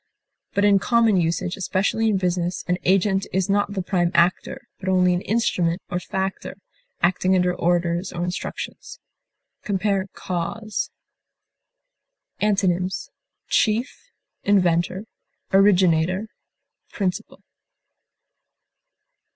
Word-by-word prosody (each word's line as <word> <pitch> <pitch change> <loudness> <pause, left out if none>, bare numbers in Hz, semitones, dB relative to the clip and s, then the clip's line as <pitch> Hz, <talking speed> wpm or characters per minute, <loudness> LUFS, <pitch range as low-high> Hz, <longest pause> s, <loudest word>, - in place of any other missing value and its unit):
But 200 - +3
in 200 -1 +5
common 230 -1 +3
usage, 175 +1 0
especially 195 +4 0
in 205 - +2
business, 180 -1 -1
an 180 0 0
agent 195 +1 +2
is 190 +1 0
not 205 0 +1
the 190 -2 -2
prime 175 -2 +1
actor, 170 +2 +1
but 190 - -3
only 180 -1 +3
an 175 - -1
instrument 185 -6 0
or 175 - 0
factor, 190 +2 -4 0.5
acting 185 +1 +3
under 180 -1 +2
orders 175 +1 0
or 175 -1 -4
instructions. 180 0 -5 0.6
Compare 195 -1 0
CAUSE. 190 +5 -3 1.5
Antonyms: 190 -3 0 0.4
chief, 225 +4 0 0.3
inventor, 185 0 +2 0.5
originator, 185 0 +3 0.6
principal. 185 -4 -4
185 Hz, 100 wpm, -23 LUFS, 175-200 Hz, 1.5 s, in